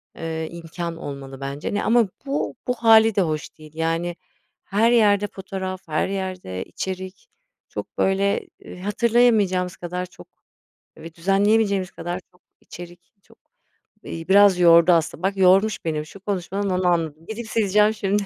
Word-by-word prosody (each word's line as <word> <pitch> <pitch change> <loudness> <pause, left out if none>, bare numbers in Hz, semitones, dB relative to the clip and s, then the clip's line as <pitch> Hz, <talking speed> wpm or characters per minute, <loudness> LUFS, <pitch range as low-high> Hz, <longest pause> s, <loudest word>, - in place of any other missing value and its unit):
eee, 160 -1 -4
imkân 170 0 -6
olmalı 135 -3 -8
bence 140 +5 -4
ne 205 - -1
ama 230 0 +3 0.2
bu 280 +1 -2
bu 250 - +2
hâli 225 -2 +5
de 200 - +3
hoş 155 -3 -3
değil, 155 -1 -14
yani, 165 +2 -1 0.5
her 215 +4 +2
yerde 205 -3 +4
fotoğraf, 190 -1 -6
her 155 -1 0
yerde 185 - -4
içerik, 190 - -6 0.4
çok, - - -8
böyle, 195 +1 +1 0.2
ııı, - - -10
hatırlayamayacağımız 205 -3 +2
kadar 180 +1 -4
çok 180 - -16 0.7
ve 160 +1 -11
düzenleyemeyeceğimiz 195 +1 +2
kadar 175 0 -5
çok 180 - -29 0.2
içerik 175 0 -11 0.2
çok, - - -23 0.7
eee, 165 0 -7
biraz 200 -2 +6
yordu 170 0 +6
aslında, 165 0 0
bak 195 +1 0
yormuş 195 +3 +3
benim 155 -2 -2
şu 155 +6 -13
konuşmadan 195 0 -3
onu 185 -1 0
anladım. 165 -2 -1
Gidip, 220 +3 -6
sileceğim 210 0 +3
şimdi. 205 -1 0
185 Hz, 150 wpm, -22 LUFS, 170-205 Hz, 0.7 s, biraz